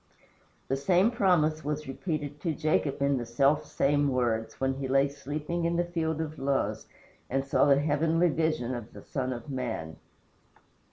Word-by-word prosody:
The 135 - 0
same 180 - +3
promise 160 -8 +2
was 150 0 -3
repeated 145 0 -4
to 165 -3 -1
Jacob 155 -3 0
in 140 -1 +2
the 120 - -4
self 140 +6 +3
same 145 +1 +2
words, 120 -4 -1
when 135 0 +1
he 135 0 -4
lay 135 +1 +3
sleeping 150 +4 -4
in 170 +1 +1
the 175 +1 +1
field 160 -2 -2
of 155 -2 -4
Luz 135 0 -1 0.4
and 135 +1 0
saw 135 -1 +3
the 140 -1 +5
heavenly 160 +4 +2
vision 155 -5 0
of 120 -2 -7
the - - -11
Son 130 -2 -3
of 120 -2 -6
man. 115 -12 -4
145 Hz, 170 wpm, -29 LUFS, 135-160 Hz, 0.4 s, the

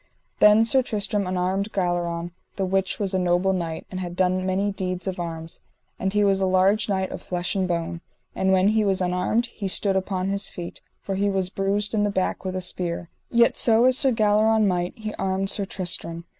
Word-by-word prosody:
Then 210 +2 +6
Sir 260 +3 +3
Tristram 210 -4 -2
unarmed 185 +3 -1
Galleron, 175 -2 -1 0.2
the 195 - -1
which 190 0 0
was 200 -2 -2
a 190 - +1
noble 180 +1 +2
knight, 165 -3 -4
and 185 - -4
had 175 -1 -5
done 185 0 +1
many 195 +2 0
deeds 185 -2 -3
of 190 -2 -4
arms, 165 -1 -6 0.4
and 190 - -1
he 210 +1 +2
was 195 -1 +2
a 190 - +2
large 190 +4 +2
knight 190 -1 -1
of - - -6
flesh 180 0 -2
and 190 -1 0
bone. 170 -1 -3 0.3
And 190 0 +1
when 190 +1 +4
he 215 0 +2
was 195 -2 +1
unarmed 180 +6 0
he 220 -4 -6
stood 195 +1 +1
upon 190 0 -1
his 200 0 -1
feet, 175 -1 -8 0.2
for 195 - -3
he 200 +1 +1
was 190 -2 -1
bruised 200 +2 -1
in 215 - +1
the 205 - +2
back 190 -2 -1
with 185 -1 -4
a 185 - -2
spear; 175 -1 -2 0.2
yet 235 0 +4
so 230 +1 +4
as 255 0 +5
Sir 265 0 +3
Galleron 215 -1 +3
might, 180 -1 -1
he 215 -1 -5
armed 195 0 0
Sir 200 - 0
Tristram. 170 -3 -2
190 Hz, 210 wpm, -24 LUFS, 180-205 Hz, 0.4 s, Then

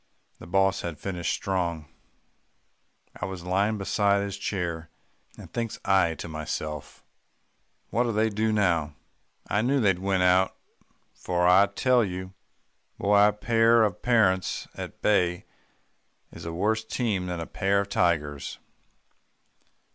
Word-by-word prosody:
The - - -11
boss 95 +1 +2
had 85 -3 -5
finished 90 -3 -3
strong, 85 -5 -2 1.3
I - - -4
was 95 -2 -7
lying 100 +4 +1
beside 100 0 +1
his 100 -1 -4
chair, 85 -5 -4 0.5
and - - -12
thinks 115 -2 -3
I 95 -4 +3
to - - -7
myself, 75 -1 -6 0.9
'What'll 120 +1 +1
they 110 +1 +1
do 110 +2 0
now?' 85 -8 +1 0.5
I 105 - +1
knew 135 +4 +2
they'd 95 -6 +2
win 95 -1 +1
out, 90 +1 +3 0.6
for 90 -1 0
I 95 +3 +6
tell 125 +4 +2
you, 95 -1 -5 0.6
Boy, 100 +1 +4
a - - +3
pair 115 +2 +3
of 100 -4 -1
parents 100 -7 +1
at - - -9
bay 90 -4 +2 0.9
is - - -10
a 85 - -4
worse 110 +6 0
team 110 -5 -2
than 90 -1 -4
a 85 - -4
pair 100 +2 0
of 100 - -6
tigers." 75 -7 0
95 Hz, 135 wpm, -26 LUFS, 90-105 Hz, 1.3 s, I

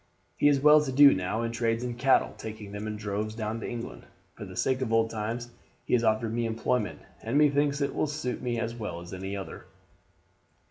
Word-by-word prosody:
He - - +3
is 145 -2 +4
well 150 +2 +7
to 145 -3 -3
do 140 +1 +8
now, 95 +5 -2
and 115 0 -2
trades 115 0 0
in 125 -1 -3
cattle, 130 +3 +2
taking 110 -2 -8
them 105 +1 -5
in 105 - -3
droves 105 +1 -3
down 110 0 -3
into 115 - -5
England. 120 -1 -7 0.3
For - - -9
the - - -10
sake 130 0 0
of 120 -3 -2
old 115 0 +2
times 115 +2 -4 0.3
he - - -3
has 120 -1 +4
offered 110 0 +1
me 120 0 0
employment, 115 0 -1 0.2
and 115 +5 -1
methinks 145 -1 +3
it 140 - 0
will - - 0
suit 145 -4 -3
me 120 -2 -2
as 115 0 -2
well 105 -7 -5
as 85 +2 -10
any 95 +2 -4
other." 95 - -8
115 Hz, 220 wpm, -28 LUFS, 110-130 Hz, 0.3 s, do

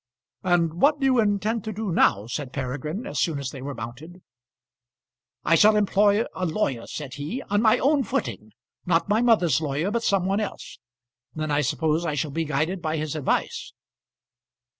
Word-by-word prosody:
"And 175 -2 +1
what 290 +1 +4
do 270 - 0
you 260 -2 +4
intend 210 +1 +1
to 220 - -3
do 215 -2 -3
now?" 105 -10 +3
said 125 +3 -5
Peregrine 145 - -4
as - - -4
soon 160 -4 +1
as 140 -1 -4
they 135 - -9
were 140 +1 -5
mounted. 140 +11 -9 1.2
"I - - +2
shall 210 +6 +6
employ 205 +1 +3
a 185 - -5
lawyer," 145 - -1
said 140 -4 -6
he, 150 - -5
"on 205 0 +3
my 225 +1 +5
own 280 +1 +2
footing; 110 - -3 0.3
not 175 +2 +1
my 215 +2 +3
mother's 180 - +3
lawyer, 155 +6 -1
but 235 +1 0
some 195 -5 +1
one 195 +2 +1
else. 210 - -6 0.6
Then 155 -1 -3
I 145 0 +2
suppose 155 +3 0
I 155 -3 -1
shall 145 +1 -2
be 165 +3 -2
guided 160 +5 -1
by 160 -1 -1
his 155 0 -3
advice." 150 -4 -2
165 Hz, 185 wpm, -25 LUFS, 145-210 Hz, 1.2 s, shall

